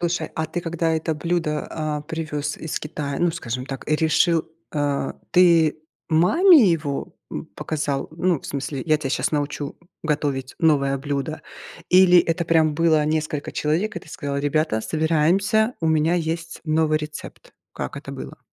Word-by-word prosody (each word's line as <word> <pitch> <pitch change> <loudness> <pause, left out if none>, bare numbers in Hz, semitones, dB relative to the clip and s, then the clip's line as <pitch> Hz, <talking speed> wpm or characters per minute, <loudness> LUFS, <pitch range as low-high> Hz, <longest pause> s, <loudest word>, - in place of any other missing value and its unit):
Слушай, 175 0 -1
а 160 0 -1
ты 175 +3 -4
когда 165 -1 -1
это 160 0 -1
блюдо, 165 -1 -1
а, 155 -2 -3
привёз 150 -2 -4
из 160 - -4
Китая, 145 -2 -4
ну, 175 0 +2
скажем 125 -6 -5
так, 135 0 -7
и 155 - +3
решил, 160 +1 +2 0.3
э, 145 -2 0 0.2
ты 170 -4 +5 0.3
маме 235 - +6
его, 145 -4 -2 0.2
м, - - -5
показал, 145 -3 -2
ну, 170 -2 0
в - - -10
смысле: 140 -1 -4
"Я 155 -1 +4
тебя 140 -3 -4
сейчас - - 0
научу 145 -1 -2 0.3
готовить 145 -4 -1
новое 140 -4 +3
блюдо?" 145 +2 -3 0.5
Или 180 -1 +7
это 165 +1 -1
прям 160 -2 +3
было 160 -2 +3
несколько 155 -1 -2
человек, 175 +9 -1
и - - -3
ты - - -17
сказал: 140 -3 -4
"Ребята, 145 -4 0
собираемся, 170 - +2
у 160 - +1
меня 160 +2 +2
есть 165 -1 -3
новый 155 -1 +2
рецепт?" 150 0 -9 0.2
Как - - -5
это - - -7
было? - - -8
155 Hz, 160 wpm, -23 LUFS, 145-165 Hz, 0.5 s, Или